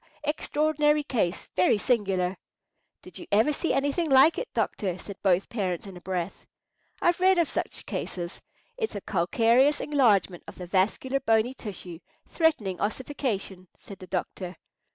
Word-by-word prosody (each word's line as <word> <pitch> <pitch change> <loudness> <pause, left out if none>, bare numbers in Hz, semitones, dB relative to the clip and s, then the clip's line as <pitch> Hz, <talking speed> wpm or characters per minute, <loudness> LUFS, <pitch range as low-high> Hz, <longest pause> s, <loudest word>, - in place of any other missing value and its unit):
extraordinary 300 0 +1
case; 210 -10 -1
very 185 +3 +4
singular." 195 -5 0 0.7
"Did - - -10
you 345 - -10
ever 220 +9 +4
see 330 - -1
anything 285 +4 0
like 270 +4 +6
it, - - -6
doctor?" 185 -4 -1
said 195 +1 -9
both 190 -1 +2
parents 190 -6 -2
in 195 -2 -9
a 180 - -11
breath. 180 0 -4 0.6
"I've 345 0 +3
read 375 0 +4
of 340 -3 +3
such - - -4
cases. 175 -1 -5 0.4
It's 445 - -2
a 205 - -4
calcareous 230 - +3
enlargement 215 - +2
of - - -9
the 180 - -7
vascular 205 +9 +1
bony 225 +1 +2
tissue, 185 -8 -8 0.3
threatening 265 - 0
ossification," 205 -5 -3
said 200 - -12
the 185 - -10
doctor. 180 0 -4
215 Hz, 150 wpm, -27 LUFS, 185-290 Hz, 0.7 s, like